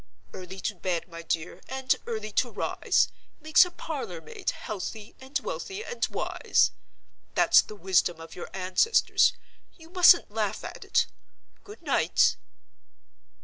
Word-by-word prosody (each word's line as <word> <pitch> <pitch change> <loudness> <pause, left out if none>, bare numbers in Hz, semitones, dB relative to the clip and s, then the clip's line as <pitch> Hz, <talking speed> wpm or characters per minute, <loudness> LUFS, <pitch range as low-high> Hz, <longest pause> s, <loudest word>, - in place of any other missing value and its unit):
Early 185 +1 -8
to 215 - -2
bed, 180 -2 -3
my 165 -1 -9
dear, 165 0 -3
and 265 0 +1
early 215 -2 -4
to 245 +4 +1
rise, 210 - +1 0.3
makes 315 +3 +5
a - - -6
parlor 285 - -6
maid 160 - -5
healthy 215 +1 -6
and 265 +2 -2
wealthy 450 -4 -5
and 480 - -5
wise. - - +1 0.6
That's - - +6
the 215 - -11
wisdom 180 -3 +1
of 165 - -10
your 175 - -7
ancestors—you 255 - 0
mustn't 355 - +6
laugh 215 -2 -2
at - - -8
it. - - +2 0.6
Good 420 +2 -13
night." - - +3
215 Hz, 135 wpm, -27 LUFS, -, 0.6 s, That's